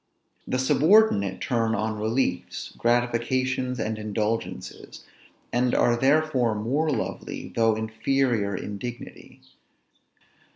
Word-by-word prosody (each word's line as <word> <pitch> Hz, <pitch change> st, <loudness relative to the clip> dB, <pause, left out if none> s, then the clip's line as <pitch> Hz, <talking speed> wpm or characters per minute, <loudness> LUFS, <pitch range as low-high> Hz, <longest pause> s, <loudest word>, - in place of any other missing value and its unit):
The 130 Hz, -, 0 dB
subordinate 130 Hz, -, +3 dB
turn 115 Hz, -2 st, 0 dB
on 110 Hz, 0 st, -2 dB
reliefs, 110 Hz, -5 st, -2 dB
gratifications, 125 Hz, +2 st, 0 dB
and 110 Hz, 0 st, -2 dB
indulgences; 110 Hz, +1 st, -4 dB, 0.5 s
and 125 Hz, 0 st, +2 dB
are 120 Hz, -, +3 dB
therefore 135 Hz, -3 st, +2 dB
more 135 Hz, +9 st, 0 dB
lovely, 130 Hz, -7 st, -4 dB
though 115 Hz, -1 st, +3 dB
inferior 110 Hz, -1 st, 0 dB
in 100 Hz, +1 st, -6 dB
dignity. 120 Hz, +1 st, -9 dB
120 Hz, 95 wpm, -25 LUFS, 110-130 Hz, 0.5 s, subordinate